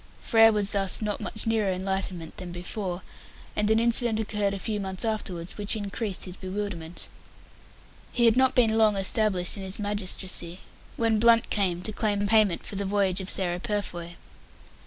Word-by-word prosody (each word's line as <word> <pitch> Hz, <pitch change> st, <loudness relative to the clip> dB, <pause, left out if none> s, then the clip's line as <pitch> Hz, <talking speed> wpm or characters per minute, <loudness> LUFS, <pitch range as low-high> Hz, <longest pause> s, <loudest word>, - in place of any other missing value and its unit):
Frere 225 Hz, 0 st, +5 dB
was 205 Hz, -2 st, -1 dB
thus 195 Hz, -2 st, 0 dB
not 210 Hz, -2 st, -3 dB
much 220 Hz, -, -4 dB
nearer 220 Hz, -3 st, +1 dB
enlightenment 185 Hz, -3 st, -3 dB
than 180 Hz, -2 st, -7 dB
before, 180 Hz, +1 st, -5 dB, 0.5 s
and 210 Hz, 0 st, +1 dB
an 220 Hz, 0 st, +4 dB
incident 235 Hz, -1 st, +2 dB
occurred 210 Hz, -2 st, -1 dB
a -, -, -4 dB
few 210 Hz, +2 st, -3 dB
months 190 Hz, +2 st, -4 dB
afterwards 190 Hz, -5 st, -4 dB
which 205 Hz, +2 st, +2 dB
increased 205 Hz, -1 st, -3 dB
his 180 Hz, -1 st, -6 dB
bewilderment 185 Hz, -4 st, -5 dB, 1.0 s
He 240 Hz, -, +2 dB
had 230 Hz, -1 st, +5 dB
not 260 Hz, 0 st, +3 dB
been 225 Hz, -3 st, +3 dB
long 215 Hz, -2 st, +4 dB
established 195 Hz, -2 st, +3 dB
in -, -, -6 dB
his 190 Hz, 0 st, -1 dB
magistracy, 190 Hz, -3 st, -1 dB, 0.4 s
when 225 Hz, -2 st, +2 dB
Blunt 230 Hz, 0 st, +4 dB
came 180 Hz, -4 st, 0 dB
to 215 Hz, -, -4 dB
claim 205 Hz, -1 st, 0 dB
payment 210 Hz, -4 st, +2 dB
for 200 Hz, -, -6 dB
the 200 Hz, -, -1 dB
voyage 195 Hz, -1 st, 0 dB
of 190 Hz, -, -3 dB
Sarah 175 Hz, -2 st, +2 dB
Purfoy. 175 Hz, -5 st, -4 dB
205 Hz, 170 wpm, -26 LUFS, 185-220 Hz, 1.0 s, Frere